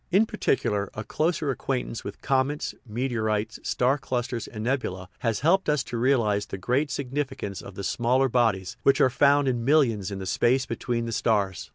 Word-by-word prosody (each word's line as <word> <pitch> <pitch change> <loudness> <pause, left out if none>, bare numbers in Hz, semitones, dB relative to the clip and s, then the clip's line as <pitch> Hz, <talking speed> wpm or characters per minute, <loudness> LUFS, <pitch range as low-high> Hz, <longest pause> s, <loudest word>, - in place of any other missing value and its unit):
In 195 +5 +4
particular, 105 - 0
a 110 - -4
closer 155 +2 0
acquaintance 125 -2 -3
with 100 0 -8
comets, 135 +2 0
meteorites, 110 -2 -1
star 130 +4 +1
clusters, 120 -3 -3
and 110 -2 -7
nebulae 115 -7 -2
has 115 -2 -1
helped 175 +4 +3
us 150 -3 +2
to - - -7
realize 115 -5 +2
the - - -5
great 125 +10 0
significance 130 -9 -3
of 100 - -11
the 100 - -6
smaller 125 +6 +2
bodies 115 -7 +1
which 135 -1 +4
are 130 - +4
found 140 +2 +4
in 120 -3 0
millions 120 -8 +3
in 100 - -5
the 95 - -6
space 130 +7 +2
between 120 -1 -2
the 115 - -4
stars. 100 -9 0
120 Hz, 180 wpm, -26 LUFS, 105-135 Hz, -, In